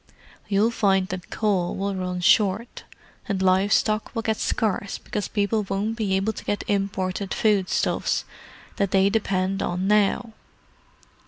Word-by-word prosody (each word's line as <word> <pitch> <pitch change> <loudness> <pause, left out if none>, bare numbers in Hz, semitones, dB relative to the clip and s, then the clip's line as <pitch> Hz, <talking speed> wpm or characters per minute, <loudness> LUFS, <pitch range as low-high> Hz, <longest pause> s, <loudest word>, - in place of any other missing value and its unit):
You'll 210 +3 +2
find 195 -4 +2
that 185 -1 -6
coal 195 -5 0
will 200 +1 -2
run 180 -1 -3
short; 205 +5 +2 0.4
and 195 -2 0
live 190 +2 +3
stock 215 +1 +2
will 225 - -2
get 220 -1 0
scarce 200 -2 -1
because 210 - -4
people 210 +1 0
won't 205 +3 -1
be 210 -4 0
able 195 +3 0
to - - -9
get 205 - -2
imported 195 -1 -1
food 205 -4 +2
stuffs - - 0 0.5
that 200 -1 +1
they 195 +1 +3
depend 195 -3 0
on 180 +2 -2
now. 210 +3 +2
200 Hz, 150 wpm, -24 LUFS, 190-215 Hz, 0.5 s, live